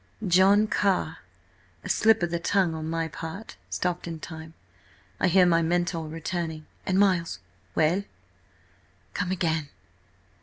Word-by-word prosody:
"John 190 +4 +5
Carr–a 95 - -3
slip 220 -3 +4
of 175 - 0
the 170 - -1
tongue 185 -1 +1
on 160 0 -4
my 165 0 -1
part, 165 +7 -7
stopped 180 -1 -2
in 165 -1 -5
time. 160 0 -9 0.6
I - - +3
hear 185 +1 +5
my 170 -1 +4
mentor 170 -1 0
returning–and–Miles!" 170 - -1 0.4
"Well?" 170 +6 +2 1.1
"Come 180 - -2
again!" 160 -5 -1
170 Hz, 115 wpm, -26 LUFS, 160-185 Hz, 1.1 s, John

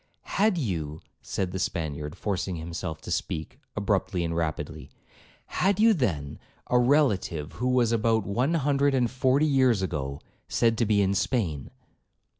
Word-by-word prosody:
'Had 210 -2 +1
you,' 80 - -2 0.2
said 95 -2 -3
the 95 - -4
Spaniard, 80 -7 -3
forcing 95 -3 -2
himself 80 -1 -5
to - - -7
speak, 80 - -3 0.2
abruptly 100 -3 0
and 85 0 -2
rapidly, 80 -2 -3 0.6
'had 195 +2 +1
you, 225 +1 +6
then, 80 - -2 0.3
a 125 - +5
relative 110 - +2
who 125 - -3
was, 125 -3 +3
about 110 -2 +2
one 125 - +1
hundred 140 -2 +2
and 125 -3 +1
forty 130 +3 +2
years 130 -8 +3
ago, 70 -6 -3 0.3
said 115 -1 +2
to 115 - +2
be 100 -1 +3
in 95 0 +1
Spain.' 95 - -1
105 Hz, 150 wpm, -27 LUFS, 85-130 Hz, 0.6 s, you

